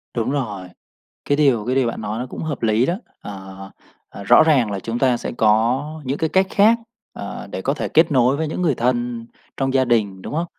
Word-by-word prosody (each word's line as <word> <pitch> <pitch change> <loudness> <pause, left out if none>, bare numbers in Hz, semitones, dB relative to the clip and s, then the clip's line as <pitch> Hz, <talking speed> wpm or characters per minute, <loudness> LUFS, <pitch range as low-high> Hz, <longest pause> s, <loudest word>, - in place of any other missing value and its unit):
Đúng 115 +1 -1
rồi. 105 -10 -3 0.6
Cái 145 - +2
điều 135 -8 +2
cái 125 +2 -1
điều 130 -2 +2
bạn 115 - -4
nói 105 +1 -4
nó 125 - -3
cũng - - -7
hợp 150 -5 -4
lý 110 +2 +2
đó. 170 - 0 0.3
Ờ, 95 -1 -9 0.4
à, 100 - -10
rõ 120 +8 +6
ràng 135 -9 +3
là 100 - -3
chúng 115 +4 -4
ta 130 -3 +3
sẽ - - -5
có 115 +6 +2 0.2
những 135 +3 -2
cái 160 - -1
cách 190 +3 +3
khác, 215 +3 +4 0.4
à, 100 - -7
để - - -4
có 135 - 0
thể - - -3
kết 160 +1 +4
nối 130 0 +3
với 160 +1 -1
những 155 - -4
người 160 -7 +2
thân 120 -1 -1 0.3
trong 135 -1 -1
gia 130 -1 +3
đình, 105 -6 0
đúng - - -7
hông? 165 +3 -1
125 Hz, 230 wpm, -20 LUFS, 110-145 Hz, 0.6 s, rõ